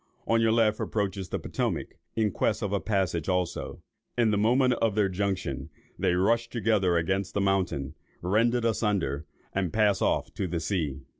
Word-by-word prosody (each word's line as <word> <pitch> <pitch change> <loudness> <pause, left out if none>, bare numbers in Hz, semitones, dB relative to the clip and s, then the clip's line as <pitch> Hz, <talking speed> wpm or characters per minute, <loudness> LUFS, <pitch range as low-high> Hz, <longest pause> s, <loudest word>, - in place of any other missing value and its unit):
On 115 0 +3
your 115 -1 +4
left 110 -2 +3
approaches 100 -3 -2
the - - -1
Potomac, - - -2 0.3
in 110 -2 +1
quest - - 0
of 100 -1 -1
a 100 - +2
passage 95 -7 -1
also; 90 -2 -2 0.3
in 115 -3 +3
the - - +2
moment 125 +4 +4
of 110 -3 +2
their 105 -2 +3
junction, 95 0 -2 0.3
they 90 - +2
rush 115 +6 +2
together 105 -7 +2
against 95 +3 -1
the - - +2
mountain, 95 -8 0 0.3
rend 110 +6 +3
it 120 -1 0
asunder, 95 - 0 0.3
and 95 -3 0
pass 105 -3 +2
off - - 0
to 95 - -2
the 85 -1 -2
sea. 80 -6 -2
100 Hz, 175 wpm, -28 LUFS, 90-110 Hz, 0.3 s, your